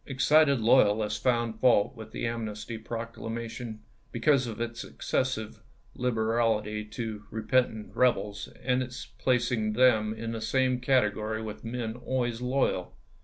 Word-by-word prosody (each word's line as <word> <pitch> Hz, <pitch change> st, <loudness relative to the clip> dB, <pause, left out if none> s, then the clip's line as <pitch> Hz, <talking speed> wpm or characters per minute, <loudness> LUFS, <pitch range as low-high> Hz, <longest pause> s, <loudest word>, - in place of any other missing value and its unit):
Excited 140 Hz, +1 st, +4 dB
loyalists 105 Hz, -2 st, +3 dB
found 115 Hz, -3 st, +1 dB
fault 125 Hz, -2 st, +4 dB
with 110 Hz, -2 st, -9 dB
the 115 Hz, -, -4 dB
Amnesty 110 Hz, -1 st, -4 dB
Proclamation 115 Hz, 0 st, -6 dB, 0.3 s
because 130 Hz, +1 st, +2 dB
of 115 Hz, -2 st, -6 dB
its 115 Hz, 0 st, -3 dB
excessive 120 Hz, -5 st, -2 dB, 0.3 s
liberahty 110 Hz, -3 st, 0 dB
to 110 Hz, -2 st, -5 dB
repentant 110 Hz, 0 st, 0 dB
rebels, 105 Hz, -5 st, +1 dB
and 125 Hz, 0 st, +2 dB
its 125 Hz, -1 st, -6 dB
placing 120 Hz, -4 st, 0 dB
them 110 Hz, -3 st, +4 dB
in 115 Hz, +1 st, -4 dB
the 115 Hz, -1 st, -4 dB
same 130 Hz, +2 st, +1 dB
category 110 Hz, -4 st, +1 dB
with 110 Hz, -1 st, -7 dB
men 115 Hz, -1 st, -3 dB
always 120 Hz, -1 st, -2 dB
loyal. 125 Hz, -7 st, 0 dB
115 Hz, 125 wpm, -28 LUFS, 110-125 Hz, 0.3 s, Excited